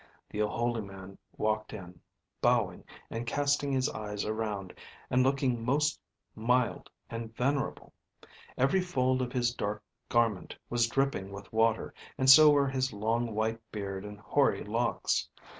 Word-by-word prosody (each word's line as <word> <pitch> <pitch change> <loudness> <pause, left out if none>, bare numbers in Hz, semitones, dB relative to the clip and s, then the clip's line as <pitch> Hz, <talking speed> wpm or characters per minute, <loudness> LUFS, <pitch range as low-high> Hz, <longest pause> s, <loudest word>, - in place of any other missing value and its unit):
The 105 - -5
holy 115 +2 0
man 95 -1 -10 0.2
walked 110 0 -1
in, 90 -4 -9 0.4
bowing - - +1 0.3
and 115 +1 -4
casting 145 +1 +1
his 130 0 +2
eyes 105 -4 -4
around, 105 -4 -3 0.4
and 125 - +4
looking 130 -3 +1
most 145 +5 +1 0.3
mild 125 +2 0 0.2
and 115 -1 -6
venerable. 135 +3 -1 0.6
Every 135 +9 +3
fold 130 -7 +1
of 125 -1 -2
his 120 -2 +1
dark 105 -2 -3 0.3
garment 115 -5 +1 0.2
was 120 -1 +3
dripping 135 -6 -1
with 100 +2 -10
water, 110 0 +2 0.2
and 130 - 0
so 155 +2 +10
were 145 -1 +4
his 130 -1 -1
long 115 +2 -1
white 110 +1 0
beard 100 -2 -4
and 105 0 -9
hoary 95 - +1
locks. - - 0
115 Hz, 140 wpm, -30 LUFS, 105-130 Hz, 0.6 s, so